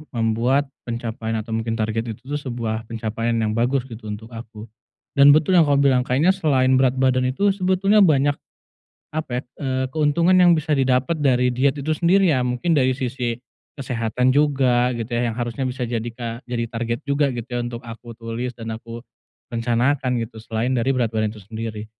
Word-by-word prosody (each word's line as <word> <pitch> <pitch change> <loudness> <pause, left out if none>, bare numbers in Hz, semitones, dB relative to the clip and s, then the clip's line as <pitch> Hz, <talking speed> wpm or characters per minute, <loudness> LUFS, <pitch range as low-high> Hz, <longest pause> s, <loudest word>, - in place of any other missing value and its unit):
membuat 120 +5 +1 0.2
pencapaian 115 -1 -4
atau 115 - -10
mungkin 115 0 -1
target 115 0 -2
itu - - -27
tuh 145 - -1
sebuah 115 -5 -4
pencapaian 115 +1 -2
yang 110 -2 0
bagus, 120 +4 +1
gitu, 115 -3 -10
untuk 110 +3 -7
aku. 115 -1 -9 0.5
Dan 140 +1 +9
betul 155 +4 +2
yang 160 - +4
kau 145 - +3
bilang, 135 -2 +4
kayaknya 150 +9 +3
selain 130 -8 +2
berat 130 -1 +3
badan 130 -1 +2
itu 195 +11 +2
sebetulnya 195 +2 +2
banyak 145 -6 +4 0.8
apa, 155 -3 -3
ya, - - -4 0.2
eee, 130 -1 -1
keuntungan 160 +4 +3
yang 180 -1 +6
bisa 155 -1 0
didapat 130 +2 +1
dari 125 -2 +2
diet 135 +3 +1
itu 155 +3 -1
sendiri, 185 +4 +3
ya, 130 - +1
mungkin 125 +7 0
dari 130 -3 +3
sisi 125 -2 -3 0.4
kesehatan 125 0 0
juga, 130 -4 +3
gitu 115 -3 -3
ya, 120 0 0
yang 115 - -7
harusnya 120 +2 -3
bisa 125 -1 -2
jadi 120 0 -3
ka 115 +1 -6
jadi 115 -1 -1
target 115 0 -3
juga, 140 0 +1
gitu 120 -2 -5
ya, 120 -1 -3
untuk 120 0 -5
aku 115 +1 -9
tulis 115 +2 -4
dan 115 -1 -5
aku 115 +1 -9 0.5
rencanakan, 125 +2 +1
gitu, 115 0 -8
selain 115 +3 -1
dari 120 +3 +1
berat 125 -3 +1
badan 110 -1 0
itu 110 - -11
sendiri. 110 +1 -6
125 Hz, 185 wpm, -22 LUFS, 115-140 Hz, 0.8 s, Dan